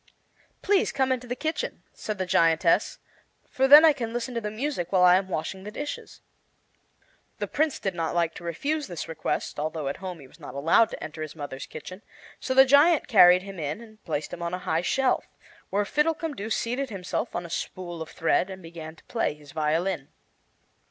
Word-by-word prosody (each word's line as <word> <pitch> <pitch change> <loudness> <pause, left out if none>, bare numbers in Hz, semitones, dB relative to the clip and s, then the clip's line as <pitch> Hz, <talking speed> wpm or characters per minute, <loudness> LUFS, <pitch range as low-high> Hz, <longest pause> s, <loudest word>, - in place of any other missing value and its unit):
"Please 395 -1 +2
come 265 -1 +1
into 250 -1 -2
the 245 - -3
kitchen," 315 +4 -3
said 215 -1 -5
the 185 - -1
giantess, 165 -2 +3 0.5
"for 265 -1 +1
then 295 +3 +10
I 315 - +7
can 235 -5 -4
listen 240 +1 -3
to 235 - -2
the 210 - -3
music 215 - -3
while 185 -2 +4
I 180 0 +7
am 190 +1 +1
washing 190 +3 -4
the 205 - -6
dishes." 290 +7 -7 1.2
The - - -2
prince 310 -1 0
did 195 - -2
not 165 -1 -2
like 170 -1 +1
to - - -11
refuse 280 - -2
this 175 - -6
request, 160 -2 -3
although 155 -1 -3
at 140 - -4
home 185 -3 -7
he 140 - -12
was 130 - -19
not 125 - -9
allowed 165 +10 +4
to - - -7
enter 155 0 -7
his 155 0 -6
mother's 145 -3 -7
kitchen; 185 +6 -9 0.4
so 260 - -2
the 265 0 +8
giant 290 +4 +5
carried 180 -5 +7
him 195 -2 -8
in 150 +4 -3
and 220 -2 -15
placed 155 -2 -3
him 175 - -6
on 170 +1 -2
a 180 - -9
high 160 +1 +1
shelf, 255 +9 +1 0.4
where 205 +1 0
Fiddlecumdoo 300 -5 -1
seated 245 +4 -1
himself 190 -4 -4
on 175 - -3
a - - -9
spool 175 -1 -5
of 160 - -6
thread 175 +2 +1
and 190 -1 -9
began 165 -1 -9
to - - -21
play 225 -10 -1
his 145 -2 -15
violin. 155 0 -1
190 Hz, 205 wpm, -26 LUFS, 165-255 Hz, 1.2 s, then